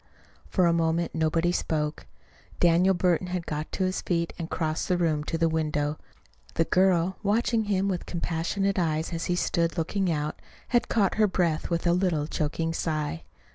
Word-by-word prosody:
For 185 - +2
a 170 - +4
moment 165 0 0
nobody 165 +2 +1
spoke. 155 -3 -2 0.5
Daniel 175 +2 +4
Burton 180 0 +1
had 180 -2 -3
got 150 0 -4
to 190 - 0
his 185 0 -1
feet 170 -2 -1
and 165 -1 -4
crossed 155 -2 -2
the 180 - +2
room 160 -4 +1
to 165 - -2
the 165 0 +2
window. 150 -2 -1 0.6
The 165 - +2
girl, 185 0 +2
watching 220 +2 +1
him 195 -1 +1
with 185 -3 -2
compassionate 180 +3 -1
eyes 160 0 -1
as 165 0 -3
he 180 - 0
stood 170 -1 0
looking 185 +3 0
out, 150 -1 -3 0.3
had 240 -1 +2
caught 205 -4 +2
her 215 - +6
breath 170 -4 0
with 170 0 -1
a 170 - +4
little 175 -5 +1
choking 160 +1 -2
sigh. 155 - -2
170 Hz, 175 wpm, -27 LUFS, 160-185 Hz, 0.6 s, her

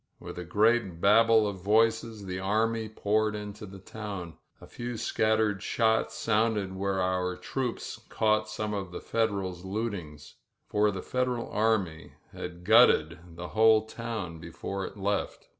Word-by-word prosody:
With - - -8
a - - -4
great 105 0 +2
babble 115 +2 +5
of 95 -3 -5
voices 110 +1 +2
the 90 -1 -4
army 110 +3 0
poured 110 0 0
into 105 0 -7
the 100 +1 -10
town. 95 -4 -7 0.3
A - - -12
few 120 -1 -6
scattered 110 -2 +1
shots 110 -1 +1
sounded 105 -3 0
where 95 0 -1
our 90 0 0
troops 130 -3 -4
caught 110 0 +1
some 110 0 -3
of 95 -3 -4
the - - -6
Federals 100 -6 -1
looting 95 -6 -4 0.3
— - - -51
for 105 0 +3
the 95 -2 -4
Federal 125 -2 -1
army 100 -7 0 0.2
had 90 0 -7
gutted 90 -6 +5 0.2
the 90 +1 -7
whole 110 0 +5
town 110 -7 -5
before 95 +4 -5
it - - -12
left. 100 0 -2
105 Hz, 150 wpm, -29 LUFS, 95-110 Hz, 0.3 s, babble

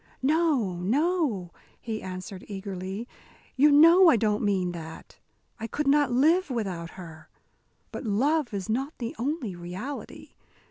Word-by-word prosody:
"No, 280 - +1
no," 245 - 0 0.3
he 220 -2 -5
answered, 185 0 -7
eagerly, 195 +2 -6 0.5
"you 290 +3 +5
know 335 +5 +7
I 315 - +5
don't 210 -1 +1
mean 190 -4 0
that. 160 -2 -10 0.4
I 225 - -4
could 300 +6 -3
not 285 -1 +3
live 315 +8 +3
without 190 -9 -3
her. 160 -3 -11 0.6
But - - -6
love 270 +7 +1
is 200 -2 -4
not 265 +7 -2
the 235 -2 -5
only 255 - -2
reality. 180 +11 -7
225 Hz, 135 wpm, -27 LUFS, 185-290 Hz, 0.6 s, know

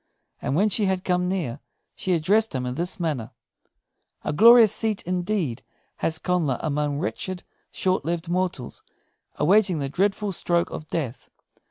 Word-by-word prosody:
And 135 - -1
when 205 +6 +3
she 205 +1 +2
had 190 -1 0
come 180 0 0
near, 160 -9 -2 0.3
she 185 - -1
addressed 200 +4 +2
him 125 -1 -2
in 125 - -3
this 180 +8 -1
manner: 145 -10 -2 0.9
"A - - -2
glorious 230 +4 +8
seat, 220 -3 -1
indeed, 180 - -2 0.4
has 160 - -1
Connla 160 -6 0
among 150 -1 -1
wretched, 180 +2 -4 0.3
short 185 -3 0
lived 170 +2 -3
mortals, 180 -7 -2 0.5
awaiting 190 +3 +3
the 140 -2 -2
dreadful 200 +5 0
stroke 170 -1 0
of 155 - -7
death! 135 -7 -4
180 Hz, 150 wpm, -24 LUFS, 150-190 Hz, 0.9 s, glorious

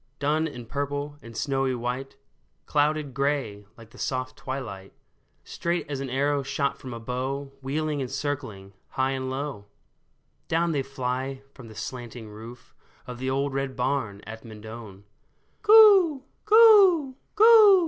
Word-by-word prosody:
Dun 150 +3 0
and 125 -6 -9
purple 145 +2 -4
and 115 -3 -11
snowy 135 -2 0
white, 125 +3 -4 0.5
Clouded 150 -1 0
gray, 135 -7 -2
like 115 -1 -15
the - - -15
soft 130 -1 -3
twilight, 115 -8 -7 0.5
Straight 170 +1 -3
as 140 - -3
an 135 -1 -4
arrow 140 +2 +1
shot 140 +1 -2
from 130 -3 -8
a 115 - -6
bow, 130 +4 -4
Wheeling 150 +2 -2
and 130 - -4
circling 130 -9 -5
high 130 0 -1
and 130 -1 -3
low, 130 -6 -5 0.8
Down 165 +1 +1
they 145 -3 0
fly 130 0 -4
from 125 -4 -12
the 110 - -13
slanting 120 0 -7
roof 115 +3 -12 0.3
Of 125 -1 -8
the 130 +1 -2
old 140 +1 -1
red 135 -1 -3
barn 125 -6 -2
at 110 +1 -9
Mendon. 110 -2 -10 0.3
" - - -43
Coo! 405 -9 +7 0.2
coo! 410 - +6 0.2
coo 430 -2 +8
135 Hz, 150 wpm, -26 LUFS, 120-145 Hz, 0.8 s, coo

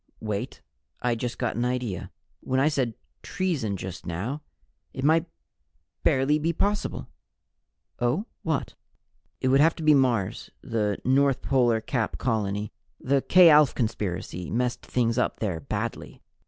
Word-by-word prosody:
"Wait! 105 -2 -4 0.4
I 125 -1 +2
just 120 +1 -4
got 120 - -1
an 120 - 0
idea. 125 -7 -2 0.3
When 130 0 -1
I 140 +3 +4
said 130 -7 -1 0.3
'treason,' 155 - -2
just 95 -1 -7
now 105 - -4 0.5
It 130 - -4
might 160 +3 +3 0.7
barely 135 +3 +3
be 165 +2 0
possible 205 +5 -1 0.5
" - - -52
"Oh, 120 - +1 0.2
what?" 160 -4 -2 0.7
"It 130 - +2
would 135 +1 +5
have 160 +2 +4
to 165 - -7
be 155 0 +6
Mars, 125 -8 +1
the 105 -3 -1
North 135 +1 +3
Polar 120 -4 +2
Cap 115 0 -2
colony. 105 -3 -1 0.3
The 135 +1 +1
K 180 +1 +7
Alph 150 -2 +5
Conspiracy 95 -6 -3
messed 125 +1 -1
things 115 -1 0
up - - 0
there 95 -7 -2
badly." 70 - -5
125 Hz, 145 wpm, -26 LUFS, 110-140 Hz, 0.7 s, K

